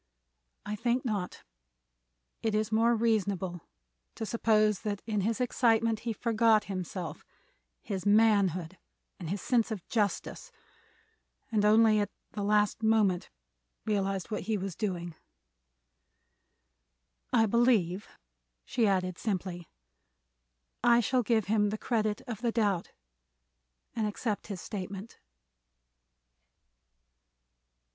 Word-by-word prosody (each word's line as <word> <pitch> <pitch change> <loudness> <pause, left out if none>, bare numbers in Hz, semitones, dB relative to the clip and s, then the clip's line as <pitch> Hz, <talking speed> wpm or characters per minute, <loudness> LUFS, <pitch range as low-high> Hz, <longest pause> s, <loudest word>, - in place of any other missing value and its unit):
I 210 - -3
think 240 +4 0
not. 205 -6 -3 1.0
It 220 -2 0
is 215 0 0
more 230 +2 +3
reasonable 200 -6 0 0.5
to 220 - -4
suppose 215 -1 +2
that 205 -2 -4
in 210 -3 -1
his 220 +3 -1
excitement 230 -3 +2
he 230 +1 -3
forgot 225 -1 +3
himself—his 195 - -7
manhood 200 -5 +3 0.4
and 170 -4 -6
his 195 +2 -3
sense 240 -3 +2
of 210 -6 -6
justice—and 210 +2 -5
only 215 0 +5
at 205 - 0 0.2
the 210 - -5
last 210 +1 +2
moment 215 -5 +2 0.6
realized 195 -1 -1
what 210 - -2
he 220 - +2
was 190 -2 -4
doing. 175 -5 -3 2.2
I 225 -3 +4
believe," 215 -5 +2 0.6
she 230 -3 +1
added, 185 -2 0
simply, 185 -5 -3 1.1
"I 240 0 +6
shall 250 +3 +2
give 225 -3 +1
him 210 0 +2
the 215 - -3
credit 215 -2 -1
of 230 -4 -6
the 240 -2 +1
doubt 205 -6 0 1.0
and 220 -2 0
accept 210 0 -3
his 195 -4 -6
statement." 200 +1 -7
210 Hz, 105 wpm, -30 LUFS, 195-225 Hz, 2.2 s, I